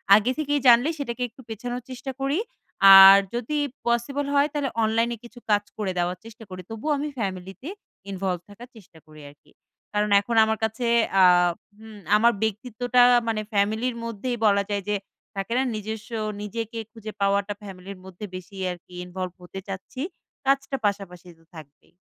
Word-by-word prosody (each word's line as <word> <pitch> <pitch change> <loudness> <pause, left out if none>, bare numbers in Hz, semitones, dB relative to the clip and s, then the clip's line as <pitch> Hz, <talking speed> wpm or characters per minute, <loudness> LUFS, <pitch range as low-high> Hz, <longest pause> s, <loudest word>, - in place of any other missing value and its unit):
আগে 220 +4 +2
থেকেই 290 -1 0
জানলে 240 +5 +6
সেটাকে 250 -3 -4
একটু 260 +4 -16
পেছানোর 245 +3 -5
চেষ্টা 255 +1 -6
করি। 280 +7 0 0.6
আর 195 +1 +11 0.2
যদি 250 +6 -2 0.3
পসিবল 255 +5 0
হয় 285 +1 +4
তাহলে 285 -3 -1
অনলাইনে 230 +2 +1
কিছু 240 +1 -13
কাজ 205 0 +3
করে 200 -3 -2
দেওয়ার 175 +1 -1
চেষ্টা 225 0 -12
করি। 185 0 -8
তবুও 225 +8 -3
আমি 295 +2 -3
ফ্যামিলিতে 190 - -5 0.4
ইনভল্ভ 185 -2 -2
থাকার 235 +5 -12
চেষ্টা 185 -6 -17
করি 155 -1 -14
আরকি। 145 - -22 0.4
কারণ 210 0 +1
এখন 230 +3 -3
আমার 220 0 0
কাছে 220 +2 -1 0.4
আ - - +8 0.5
হুম, 220 -1 -12 0.2
আমার 235 +2 +4
ব্যক্তিত্বটা 245 +3 0 0.3
মানে 215 -1 0
ফ্যামিলির 220 +5 +1
মধ্যেই 230 +2 -3
বলা 200 -1 +4
যায় 200 -1 -2
যে, 210 - +1 0.4
থাকে 195 +4 -3
না? 260 - +2
নিজস্ব 220 +2 -6 0.3
নিজেকে 225 +2 -5
খুঁজে 220 -2 -8
পাওয়াটা 200 +1 +1
ফ্যামিলির 195 -1 -9
মধ্যে 190 +3 -8
বেশি 185 +2 -10 0.2
আরকি 180 +1 -12
ইনভল্ভ 180 0 -5
হতে 190 +2 -8
চাচ্ছি। 195 +7 -7 0.4
কাজটা 275 0 +1
পাশাপাশি 190 -3 -3
তো - - -24
থাকবেই। 150 -2 -14
220 Hz, 160 wpm, -24 LUFS, 195-245 Hz, 0.6 s, আর